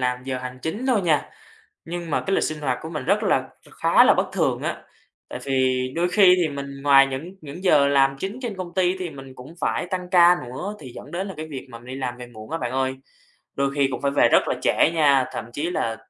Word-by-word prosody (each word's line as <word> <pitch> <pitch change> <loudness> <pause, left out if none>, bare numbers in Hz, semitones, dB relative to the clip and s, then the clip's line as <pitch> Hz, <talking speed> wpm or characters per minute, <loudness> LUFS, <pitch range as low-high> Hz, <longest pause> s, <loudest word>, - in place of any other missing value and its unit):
làm 125 0 -1
giờ 130 -1 -3
hành 125 0 -7
chính 210 +11 -3
thôi 245 -5 +3
nha, 155 -5 +1 0.5
nhưng 170 -1 -6
mà - - +1
cái 195 - +1
lịch - - +2
sinh 155 -1 -3
hoạt 130 -4 -1
của 160 - -6
mình 155 - -5
rất 200 +5 +1
là 190 -10 +2 0.3
kh - - -18
khá - - +6
là - - +6
bất - - 0
thường - - 0
á. - - -3 0.5
Tại - - -6
vì 130 -2 +1
đôi 175 +1 +1
khi 180 0 +6
thì 170 -3 +1
mình 140 -1 -7
ngoài 135 -1 +6
những 135 +8 -6
những 155 +5 -9
giờ 145 -6 +5
làm 135 -1 +3
chính 200 - -5
trên 220 -5 -4
công 175 -2 -7
ty 185 0 +2
thì 180 -3 -4
mình 135 -2 -11
cũng 130 +6 -12
phải - - -1
tăng 180 0 -4
ca 175 -1 +6
nữa, 135 +12 -6
thì 130 -4 -10
dẫn - - -10
đến 190 +3 -3
là 195 - -7
cái 155 - -6
việc 135 -2 -7
mình 115 0 -11
đi 130 - -7
làm 125 -2 -4
về 125 - -9
muộn 110 -1 -12
á 165 - -2
bạn 120 - -3
ơi. 130 0 0 0.6
Đôi 140 0 +1
khi 140 -2 +2
cũng 130 - -5
phải 140 - +1
về 140 - +4
rất - - +3
là - - +1
trễ - - +3
nha, 140 -5 +3
thậm - - -5
chí 150 +7 -2
là 115 -10 -2
145 Hz, 260 wpm, -23 LUFS, 130-175 Hz, 0.6 s, khá